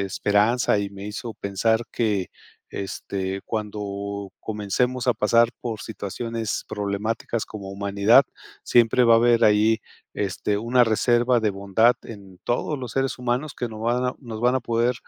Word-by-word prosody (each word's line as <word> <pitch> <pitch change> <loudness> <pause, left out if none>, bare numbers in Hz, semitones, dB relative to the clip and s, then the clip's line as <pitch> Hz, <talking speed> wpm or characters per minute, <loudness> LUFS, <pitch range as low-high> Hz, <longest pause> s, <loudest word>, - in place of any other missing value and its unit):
esperanza, 105 +3 +2
y 100 - -3
me 100 +1 -8
hizo 110 +1 -6
pensar 110 +3 0
que, 105 -5 0 0.4
este, 95 0 -4
cuando 100 -2 -4
comencemos 120 +4 -1
a - - +6
pasar 115 +2 +3
por 115 -3 -4
situaciones 110 +1 -4
problemáticas 105 +3 -2
como 100 -3 -8
humanidad, 100 +5 +4 0.4
siempre 120 +1 +4
va 115 -1 +6
a - - +7
haber 120 0 +4
ahí, 110 +1 +4 0.3
este, 100 +1 -1
una 120 +3 +3
reserva 120 +2 +2
de 110 -1 +1
bondad 100 +5 +2
en 100 -4 -11
todos 135 +4 -1
los 125 -3 -6
seres 135 -1 -1
humanos, 125 +4 -2
que 120 - -1
no 110 -1 -9
van 120 +2 0
a 125 - -2
nos 115 -4 -7
van 125 +2 +3
a 130 - +1
poder, 120 +1 +1
110 Hz, 155 wpm, -24 LUFS, 100-120 Hz, 0.4 s, a